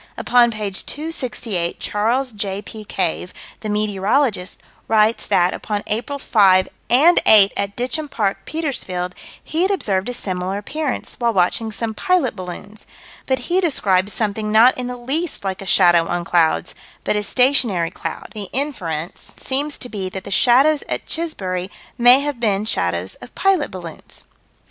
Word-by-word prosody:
Upon 240 -1 +4
page 210 -3 -4
268, 240 - -2
Charles 240 +5 0
J.P. 205 +1 -5
Cave, 180 -1 -2 0.3
the 215 - -5
meteorologist, 210 0 0 0.3
writes 220 +1 +2
that, 180 +1 +3
upon 205 -1 -4
April 240 +7 -2
5 195 -8 +4 0.2
and 305 +9 +6
8, 205 -2 +7
at 200 0 -2
Ditcham 285 +5 -2
Park, 200 -6 -1
Petersfield, 215 - -3 0.3
he 320 +2 -2
had 375 - +3
observed 205 - 0
a - - -3
similar 185 -2 -3
appearance, 275 +7 -4
while 235 -3 +1
watching 195 +5 +1
some 220 +1 -4
pilot 365 - +1
balloons 195 +3 -9 0.4
but 260 -1 0
he 365 +2 +1
describes 200 - +1
something 215 0 -2
not 230 +4 +6
in 250 -1 -4
the 250 0 -5
least 280 +6 -2
like 190 -1 -3
a 195 - -8
shadow 175 -3 +5
on 175 0 -2
clouds, 165 -2 +2 0.3
but - - 0
a 210 - +1
stationary 225 -6 +2
cloud 165 - -6
the 205 -3 -7
inference 180 - -4
seems 285 +3 -1
to - - -6
be 195 -5 -4
that 190 0 -7
the - - -8
shadows 270 +8 +4
at - - -3
Chisbury 190 - -3 0.3
may 245 +3 +7
have 290 -3 -3
been 210 -3 0
shadows 90 - -1
of - - -13
pilot 390 -6 +2
balloons. 175 -3 -7
215 Hz, 155 wpm, -20 LUFS, 190-260 Hz, 0.4 s, 8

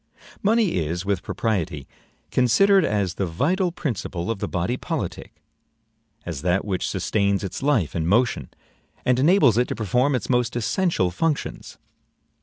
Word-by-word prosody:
Money 215 - +2
is, 85 +2 -2
with 100 -3 0
propriety, 85 - -2 0.4
considered 190 - +4
as 100 - 0
the 95 - -2
vital 175 - 0
principle 110 - -3
of 110 - -4
the - - -2
body 90 +7 -1
politic; - - -5 0.8
as 80 -6 -5
that 90 +4 +1
which 95 -3 -2
sustains 100 -1 0
its 95 - -5
life 130 - +1
and 80 -1 -1
motion, 105 - +1 0.6
and 125 0 +3
enables 140 - +5
it 125 - +2
to - - -3
perform 125 +6 +1
its 125 - -3
most 125 -1 +1
essential 120 - 0
functions. 150 - -3
115 Hz, 145 wpm, -23 LUFS, 90-140 Hz, 0.8 s, enables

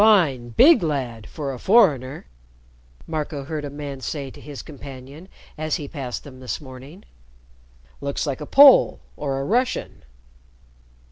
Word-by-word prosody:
"Fine, 145 - +3
big 310 -3 +7
lad 130 -9 -3
for 140 -3 -5
a 125 - -8
foreigner," 150 - +3 0.8
Marco 150 -3 -4
heard 150 +1 -5
a 145 - -4
man 140 -1 -7
say 135 +1 -5
to - - -14
his 145 -2 -9
companion 140 +3 -11 0.3
as 155 -1 -1
he 145 - -5
passed 135 -6 -6
them 130 -3 -12
this 130 -1 -4
morning. 140 +7 -12 1.0
"Looks 140 +2 -2
like 140 -1 -3
a 150 - -6
Pole 280 -1 +7 0.2
or 135 -2 -3
a - - -2
Russian." 245 - -1
145 Hz, 145 wpm, -23 LUFS, 135-160 Hz, 1.0 s, big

